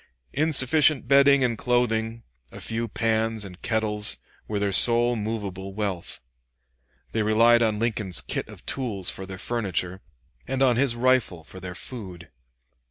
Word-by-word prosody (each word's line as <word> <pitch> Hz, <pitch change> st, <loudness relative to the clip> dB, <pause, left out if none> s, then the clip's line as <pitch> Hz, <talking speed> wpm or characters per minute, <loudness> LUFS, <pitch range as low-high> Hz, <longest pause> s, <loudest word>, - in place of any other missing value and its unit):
Insufficient 150 Hz, -2 st, +3 dB
bedding 140 Hz, 0 st, +5 dB
and 120 Hz, -3 st, -1 dB
clothing, 115 Hz, -2 st, 0 dB, 0.3 s
a -, -, -10 dB
few 115 Hz, +1 st, -3 dB
pans 110 Hz, 0 st, -1 dB
and 90 Hz, -1 st, -12 dB
kettles, 105 Hz, -2 st, -1 dB, 0.3 s
were 105 Hz, -, -3 dB
their 100 Hz, 0 st, 0 dB
sole 120 Hz, +4 st, +5 dB
movable 100 Hz, -3 st, -5 dB
wealth. 100 Hz, -5 st, -4 dB, 0.9 s
They 110 Hz, -, -1 dB
relied 115 Hz, +2 st, +4 dB
on 110 Hz, -2 st, +1 dB
Lincoln's 105 Hz, -5 st, -1 dB
kit -, -, -4 dB
of -, -, -13 dB
tools 110 Hz, -9 st, -2 dB
for 95 Hz, -, -8 dB
their 95 Hz, 0 st, -8 dB
furniture, 95 Hz, -4 st, -3 dB, 0.5 s
and 135 Hz, +1 st, 0 dB
on 125 Hz, -2 st, +4 dB
his 125 Hz, -1 st, +1 dB
rifle 120 Hz, -9 st, +1 dB
for 95 Hz, -, -10 dB
their 90 Hz, -1 st, -8 dB
food. 90 Hz, -5 st, -6 dB
110 Hz, 145 wpm, -25 LUFS, 100-120 Hz, 0.9 s, bedding